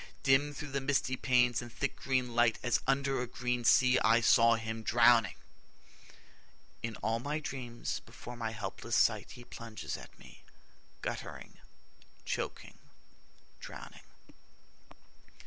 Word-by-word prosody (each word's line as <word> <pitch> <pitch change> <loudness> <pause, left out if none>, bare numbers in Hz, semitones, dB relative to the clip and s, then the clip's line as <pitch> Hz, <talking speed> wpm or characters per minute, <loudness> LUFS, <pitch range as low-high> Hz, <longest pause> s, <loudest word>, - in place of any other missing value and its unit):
Dim 135 +2 +4
through 150 0 -7
the 140 0 -1
misty 135 -1 0
panes 125 -2 +2
and 120 -1 -9
thick 140 +3 -2
green 130 -2 -1
light, 120 -1 +3
As 120 - +2
under 135 -1 +1
a 125 - -3
green 125 0 -2
sea, 125 +2 +5
I 115 +1 +4
saw 115 0 +5
him 110 0 -4
drowning. 115 -2 +4 1.5
In 115 -1 -4
all 110 +2 +1
my 145 +5 -2
dreams 125 -5 -5
before 120 - -11
my 115 -2 -3
helpless 110 +1 -4
sight 110 -3 +2
He 125 - -11
plunges 115 -2 -7
at - - -13
me, - - -16 0.6
guttering, - - -6 0.7
choking, - - -4 0.8
drowning. - - -10
120 Hz, 130 wpm, -32 LUFS, 115-130 Hz, 1.5 s, sea